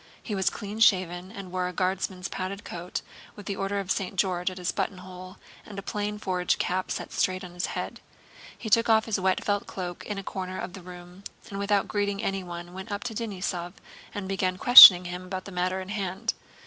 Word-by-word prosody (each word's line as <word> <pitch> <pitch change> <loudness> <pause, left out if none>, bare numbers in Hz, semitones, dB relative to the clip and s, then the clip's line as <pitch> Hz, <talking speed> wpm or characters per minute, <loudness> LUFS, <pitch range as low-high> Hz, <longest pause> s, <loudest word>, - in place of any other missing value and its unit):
He 215 - -5
was 190 -2 +1
clean 210 0 -7
shaven 185 -4 +2
and 195 -4 -9
wore 180 0 -1
a 180 - -6
Guardsman's 185 +1 -2
padded 195 +2 -5
coat 175 +1 -6 0.3
with 205 - -11
an 200 - -2
Order 195 +1 -2
of 195 -1 -4
St. 195 0 -2
George 180 -1 0
at 185 - -10
his 180 -2 -2
buttonhole 185 0 -6 0.3
and 205 - -11
a 195 - -5
plain 210 +1 -3
forage 180 -3 -1
cap 185 +1 -2
set - - -5
straight 185 0 -1
on 180 -1 -9
his 180 +1 -2
head. - - -5 0.6
He - - -8
took 230 +2 +3
off 220 0 +4
his 220 -4 -1
wet 190 0 0
felt 205 0 -1
cloak 175 -2 -6
in 210 - -4
a 195 - -5
corner 185 -1 -5
of 180 - -6
the 190 - -9
room, 180 +1 -12 0.3
and 195 - -5
without 200 0 +1
greeting 205 0 -2
anyone 175 -3 -4
went 190 +3 -8
up 205 - -4
to 235 - -4
Denísov 185 -5 -4 0.4
and 200 -2 -6
began 185 -1 -1
questioning 190 -6 +11
him 180 +1 -6
about 185 0 -6
the 200 - -9
matter 185 +1 -1
in 190 0 -8
hand. 200 +1 -2
190 Hz, 210 wpm, -26 LUFS, 180-200 Hz, 0.6 s, questioning